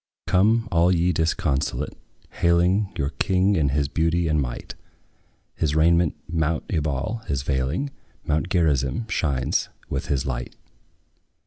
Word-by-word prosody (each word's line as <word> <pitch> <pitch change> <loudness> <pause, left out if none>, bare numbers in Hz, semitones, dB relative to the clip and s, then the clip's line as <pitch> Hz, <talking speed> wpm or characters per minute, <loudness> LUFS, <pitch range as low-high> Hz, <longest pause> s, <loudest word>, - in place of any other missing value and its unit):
Come, 110 +5 +3
all 85 +2 +4
ye 90 0 +2
disconsolate, 75 -4 -1 0.4
hailing 90 +4 +2
Your 70 - 0
King 95 +1 +2
in 75 -5 +2
his 70 +1 +1
beauty 80 +3 +1
and 75 -1 +2
might; - - -5 0.8
His 75 -1 -1
raiment 85 0 +3
mount 80 -1 0
Ebal 75 - -1
is 70 -2 -1
veiling; 70 - -1 0.3
Mount 80 +3 0
Gerizim 80 - +1
shines 70 -9 0 0.2
with - - -2
his 70 -2 0
light. 60 -2 -4
80 Hz, 125 wpm, -24 LUFS, 70-90 Hz, 0.8 s, all